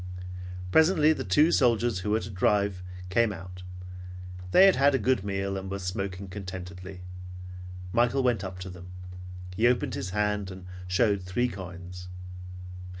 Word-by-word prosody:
Presently 160 - +6
the - - -3
two 150 - +5
soldiers 120 - +3
who 95 - -2
were 110 +1 +3
to 100 - -6
drive 100 0 +2 0.3
came 115 +2 +4
out. 90 -1 -8 0.9
They 185 - +8
had 195 - +7
had 140 +1 +5
a - - +5
good 125 -3 +2
meal 100 -1 -1
and 95 0 -5
were 100 - -2
smoking 95 +1 -3
contentedly. 95 -1 -7 0.9
Michael 120 +3 +3
went 120 -5 +2
up 95 -1 -5
to 95 - -5
them. 90 0 -10 0.7
He 110 +5 +5
opened 125 +1 +2
his 95 - -3
hand 105 0 0
and 95 -1 -8 0.2
showed 100 +2 +3
three 90 +7 +1
coins. 90 -2 -7
100 Hz, 150 wpm, -29 LUFS, 90-120 Hz, 0.9 s, They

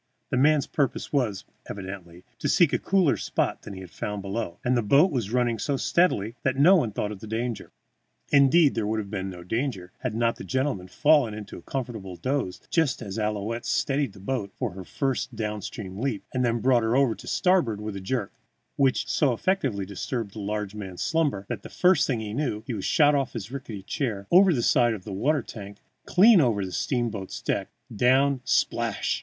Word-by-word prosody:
The - - +1
man's 145 +2 +4
purpose 140 -1 -2
was, 115 -9 0 0.2
evidently, 95 -3 -8 0.2
to 145 - -1
seek 170 -1 +4
a - - +2
cooler 185 -6 +2
spot - - -1
than 100 - -9
he 95 - -8
had 90 -2 -11
found 105 -1 -4
below, 100 -2 -4
and 125 +1 +3
the 120 - +2
boat 140 - +4
was 120 -7 -2
running 120 -2 +1
so 140 -2 -1
steadily 115 - +1
that 130 -1 0
no 170 +8 +7
one 125 - +1
thought 105 +1 -3
of 105 - -7
danger. 115 +1 -3 0.6
Indeed, 140 +2 +5
there 110 -3 -1
would 110 +1 0
have 100 -2 -4
been 95 -2 -3
no 90 -2 -9
danger 105 -3 -3
had 125 -4 -3
not 115 0 +1
the - - -8
gentleman 130 -8 -1
fallen 145 -3 +3
into 105 -2 -8
a - - -9
comfortable 110 -5 -5
doze 130 -4 -2
just 150 -8 +1
as 100 +1 -5
Ouillette 110 +2 -2
steadied 140 -5 0
the - - -14
boat 100 -1 -3
for 125 -5 -2
her 95 +1 -8
first 130 +3 -2
downward 105 -2 -3 0.2
leap 110 +1 -3
and 125 -1 0
then 120 -1 +1
brought 125 -2 +4
her 110 +2 +1
over 135 -4 +3
to - - -12
starboard 175 - +2
with 105 -1 -5
a 100 - -5
jerk, 105 +1 -2 0.4
which 135 -2 +2
jerk - - -12
so 140 -5 +2
effectually 130 - 0
disturbed 100 +2 -4
the 110 - -8
large 105 0 -3
man's 95 -4 -6
slumbers 145 -12 0
that - - -4
the - - -10
first 180 -4 +3
thing 125 -5 0
he 105 -1 -5
knew 120 -5 -2
he 125 - -4
was 100 -4 -4
shot 145 -1 +4
off 140 -3 0
his 115 0 -6
rickety 120 -8 -7
chair, 110 -4 -3
over 185 +1 +7
the 125 -7 0
side 120 -4 +3
of 95 - -10
the 100 - -7
water 140 +7 +1
tank, 100 -2 -9 0.3
clean 200 0 +7
over 110 -7 +1
the 95 - -7
steamboat's 115 -3 -2
decks, - - -1 0.3
down, 130 +4 +3
splash! - - 0
115 Hz, 205 wpm, -26 LUFS, 100-140 Hz, 0.6 s, no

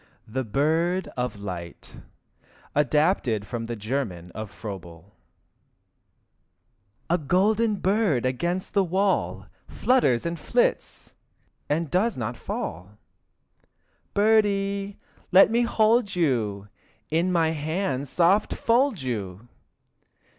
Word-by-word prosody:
etc. 110 - -23
THE 130 - 0
BIRD 160 - +1
OF 125 -2 -2
LIGHT 90 -4 -8 0.8
(Adapted 150 - +1
from 115 +1 -5
the 120 +1 -4
German 105 -6 -4
of 110 0 -6
Froebel) 95 -3 -9 1.9
A 175 +2 +1
golden 205 +8 +2
bird 195 - +1
against 170 +9 -2
the 200 - +3
wall 190 +2 0 0.2
Flutters 205 - +2
and 170 0 -3
flits, - - -1 0.6
and 155 +1 -1
does 210 +6 +1
not 120 0 -3
fall. 95 -1 -6 1.2
Birdie, 200 -2 +2 0.3
let 195 +3 +7
me 235 +1 +3
hold 225 -2 +2
you, 110 - 0 0.4
In 170 +4 +1
my 165 -2 +2
hands 150 -3 -2
soft 180 +7 +2
fold 235 - +1
you! 105 -3 -5
160 Hz, 105 wpm, -25 LUFS, -, 1.9 s, let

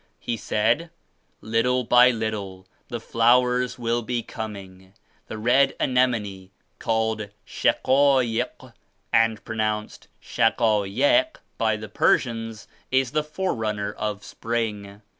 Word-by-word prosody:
He 120 - -3
said 115 +9 0 0.5
"Little 125 +3 +1
by 125 +1 +6
little 105 -5 -4 0.2
the 120 -2 -5
flowers 125 +2 +2
will 120 0 -1
be 120 0 -3
coming. 95 -4 -9 0.3
The 110 - -6
red 125 +5 +3
anemone, 110 -7 0 0.3
called 110 -2 -1 0.2
'Shaquaik' 130 -3 +1 0.4
and 115 -2 +2
pronounced 110 -1 -3
*Shaka 110 -3 +1
yek' 225 - +2 0.2
by 110 -1 +2
the 110 0 -8
Persians, 115 0 0 0.2
is 130 -1 +1
the 150 +1 0
forerunner 110 - -3
of 105 -1 -4
spring. 105 -3 -4
115 Hz, 105 wpm, -24 LUFS, 105-125 Hz, 0.5 s, by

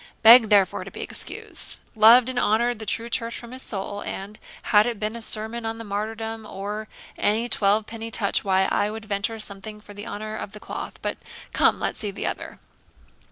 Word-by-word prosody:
Begged 230 0 +9
therefore 200 -3 +3
to - - -9
be - - -8
excused. - - +1 0.2
Loved 230 +3 +7
and 255 -1 0
honoured 235 +1 +1
the 220 - -7
true 230 +3 -1
church 230 0 -2
from 235 0 -10
his 260 +1 -5
soul, 205 -2 -5
and, 200 +2 -7 0.2
had 210 +1 +4
it 235 -4 -3
been 215 +2 -3
a 235 - -7
sermon 220 +1 0
on 225 0 -3
the 230 - -7
martyrdom, 220 +2 -4
or 210 +1 -6 0.3
any 220 +3 +1
twelve 210 -1 +2
penny 225 0 -7
touch 205 -3 +1
why, 190 -1 +2
I 205 - +1
would 220 +1 -7
venture 210 +2 -1
something 210 0 -7
for 210 -1 -13
the 205 +2 -8
honour 215 0 -5
of 205 - -7
the 210 - -8
cloth. - - -7
But - - -3 0.3
come, - - +3
let's - - -2
see 210 - +2
the 195 - -5
other. - - -4
215 Hz, 205 wpm, -24 LUFS, 205-230 Hz, 0.3 s, Begged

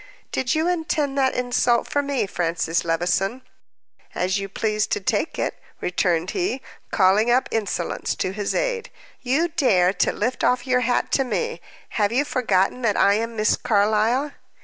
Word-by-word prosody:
"Did 260 +4 0
you 315 +2 +1
intend 315 -5 -1
that 265 -1 +2
insult 245 -1 +1
for 285 - 0
me, 280 -5 -1
Francis 170 -2 -1
Levison?" 180 +8 0 0.7
"As 185 +2 0
you 195 0 -5
please 215 +1 -1
to 420 - -1
take - - -1
it," - - -1 0.2
returned 175 -1 0
he, 355 -8 -2 0.3
calling 200 +3 +3
up 250 +2 +3
insolence 200 -6 -2
to 185 - -2
his 205 +1 -3
aid. - - -1 0.3
"You 280 +7 +1
dare 200 - +3
to - - +1
lift 245 +5 -2
off 250 0 +2
your 255 -1 +2
hat 250 0 0
to 270 - +3
me! 470 - -3 0.4
Have 205 0 +2
you 265 +5 +1
forgotten 235 -4 +1
that 230 -4 +1
I 200 - +5
am 230 +2 -2
Miss 215 0 +2
Carlyle?" 220 +6 +1
235 Hz, 165 wpm, -23 LUFS, 195-270 Hz, 0.7 s, I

